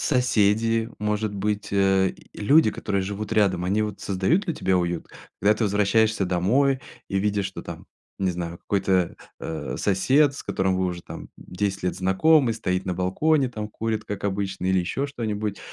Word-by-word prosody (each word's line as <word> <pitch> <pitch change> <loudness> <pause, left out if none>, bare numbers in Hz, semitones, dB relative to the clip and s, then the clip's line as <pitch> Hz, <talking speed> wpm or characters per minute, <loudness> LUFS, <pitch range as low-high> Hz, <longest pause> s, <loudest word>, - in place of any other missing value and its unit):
Соседи, 115 -3 +2
может 105 0 -1
быть, 105 +1 -2
э, 95 -1 +3 0.2
люди, 140 +4 +4
которые 100 -2 -2
живут 100 +3 -4
рядом, 95 -5 +2
они 100 +4 +1
вот 105 -2 -4
создают 100 - +1
ли 170 - -1
тебе 95 - +1
уют? 85 -1 -2 0.3
Когда 105 +2 +4
ты 110 - -1
возвращаешься 105 +1 +2
домой 125 +10 +2 0.3
и 95 - 0
видишь, 100 -1 0
что 95 - -8
там, - - -8 0.3
не 95 -1 0
знаю, 85 -1 -5
какой-то, 95 -3 0 0.2
а, 80 -1 -4
сосед, 135 +9 +3
с - - -8
которым 95 -1 0
вы 95 - 0
уже 90 -1 -3
там - - -9
10 100 +1 -3
лет 90 - -1
знакомы, 115 - +3
стоит 95 -4 -2
на 90 - -1
балконе, 130 - +1
там, 110 -3 -5
курит 110 0 -3
как 105 -2 -5
обычно 95 -2 -2
или 95 0 +3
еще 135 +11 -2
что-нибудь. 110 -6 -3
100 Hz, 170 wpm, -24 LUFS, 95-110 Hz, 0.3 s, люди